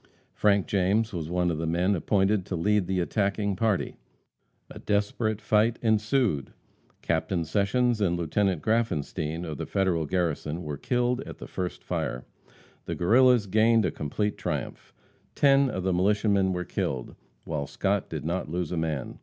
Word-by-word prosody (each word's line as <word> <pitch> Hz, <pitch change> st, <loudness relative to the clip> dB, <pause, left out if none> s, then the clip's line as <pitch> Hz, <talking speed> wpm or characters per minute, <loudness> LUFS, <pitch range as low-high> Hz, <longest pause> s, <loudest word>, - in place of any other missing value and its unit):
Frank 100 Hz, -2 st, +2 dB
James 105 Hz, +3 st, +1 dB
was 80 Hz, -3 st, -4 dB
one 90 Hz, 0 st, +1 dB
of 80 Hz, -, -3 dB
the 80 Hz, -, -2 dB
men 90 Hz, +4 st, +1 dB
appointed 100 Hz, +2 st, +1 dB
to 95 Hz, -, -3 dB
lead 100 Hz, +2 st, +1 dB
the 95 Hz, -1 st, 0 dB
attacking 100 Hz, +2 st, 0 dB
party. 110 Hz, -1 st, 0 dB, 0.7 s
A -, -, -9 dB
desperate 105 Hz, +1 st, 0 dB
fight 110 Hz, +2 st, +2 dB
ensued. 110 Hz, -, +1 dB, 0.5 s
Captain 85 Hz, -3 st, 0 dB
Sessions 105 Hz, +7 st, +1 dB
and 85 Hz, -3 st, +2 dB
Lieut. 85 Hz, -3 st, -4 dB
Graffenstien, 90 Hz, -5 st, 0 dB
of 75 Hz, -4 st, -6 dB
the -, -, -4 dB
Federal 90 Hz, -5 st, 0 dB
garrison, 85 Hz, -1 st, -1 dB
were 75 Hz, -1 st, -4 dB
killed 125 Hz, -, 0 dB
at -, -, -8 dB
the -, -, -8 dB
first 90 Hz, -1 st, -5 dB
fire. 60 Hz, 0 st, -3 dB, 0.6 s
The -, -, -3 dB
Guerrillas 120 Hz, +4 st, +4 dB
gained 110 Hz, +2 st, +3 dB
a -, -, 0 dB
complete 105 Hz, +8 st, -2 dB
triumph. -, -, -4 dB, 0.4 s
Ten 140 Hz, -1 st, +4 dB
of 95 Hz, -, -3 dB
the 95 Hz, 0 st, +1 dB
militiamen 100 Hz, +1 st, +2 dB
were 90 Hz, -1 st, -2 dB
killed, 65 Hz, -6 st, -3 dB, 0.3 s
while 75 Hz, -3 st, -3 dB
Scott -, -, -1 dB
did -, -, -5 dB
not 85 Hz, 0 st, -2 dB
lose 85 Hz, 0 st, -3 dB
a 90 Hz, -, -2 dB
man. 80 Hz, -5 st, -3 dB
95 Hz, 160 wpm, -27 LUFS, 85-110 Hz, 0.7 s, Guerrillas